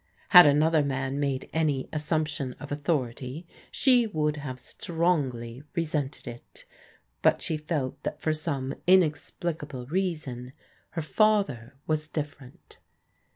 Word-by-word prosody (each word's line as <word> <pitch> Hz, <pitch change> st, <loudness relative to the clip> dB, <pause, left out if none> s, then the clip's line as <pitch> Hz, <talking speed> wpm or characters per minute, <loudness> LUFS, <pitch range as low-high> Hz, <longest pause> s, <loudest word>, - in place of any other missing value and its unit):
Had 180 Hz, -5 st, +10 dB
another 155 Hz, +2 st, +4 dB
man 135 Hz, 0 st, -2 dB
made 140 Hz, -2 st, -1 dB
any 150 Hz, -5 st, +1 dB
assumption 150 Hz, -3 st, -1 dB
of 145 Hz, +2 st, -10 dB
authority 145 Hz, 0 st, -2 dB, 0.2 s
she 250 Hz, -4 st, +4 dB
would 150 Hz, -6 st, 0 dB
have 135 Hz, -3 st, -5 dB
strongly 135 Hz, -7 st, -1 dB
re 170 Hz, -, +2 dB
sented 150 Hz, -3 st, -3 dB
it, 120 Hz, 0 st, -10 dB, 0.6 s
but -, -, +4 dB
she 160 Hz, -, 0 dB
felt 150 Hz, -4 st, -3 dB
that -, -, -4 dB
for 155 Hz, -, 0 dB
some 140 Hz, -4 st, -3 dB
inexplicable 155 Hz, -5 st, +1 dB
reason, 145 Hz, -7 st, -3 dB, 0.4 s
her 165 Hz, -, -2 dB
father 155 Hz, -, +1 dB
was 155 Hz, -1 st, -1 dB
different. 145 Hz, -4 st, -7 dB
150 Hz, 120 wpm, -27 LUFS, 135-160 Hz, 0.6 s, Had